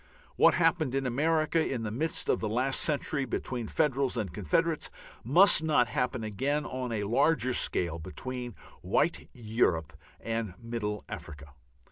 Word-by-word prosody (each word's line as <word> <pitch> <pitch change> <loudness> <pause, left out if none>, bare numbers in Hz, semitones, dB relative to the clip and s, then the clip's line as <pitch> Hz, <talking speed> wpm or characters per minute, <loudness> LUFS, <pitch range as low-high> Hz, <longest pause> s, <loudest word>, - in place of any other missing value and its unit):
What - - +5
happened 165 -5 +2
in 135 -1 0
America 155 +5 +1
in 125 -6 -3
the 105 - -3
midst 155 +8 -1
of - - +2
the 110 - -2
last 130 +5 +1
century 150 -1 0
between 120 -2 -4
Federals 135 -3 0
and 100 -7 -3
Confederates 155 - 0 0.3
must 165 - +6
not 150 -6 +2
happen 125 -2 -1
again 135 +8 -1
on 125 -1 -4
a 105 -2 -1
larger 130 +4 +2
scale 85 -7 0
between 120 +7 -6 0.3
white - - 0
Europe 105 -9 0 0.3
and 115 -5 -3
middle 115 -3 -4
Africa. 75 0 -9
125 Hz, 145 wpm, -29 LUFS, 110-145 Hz, 0.3 s, must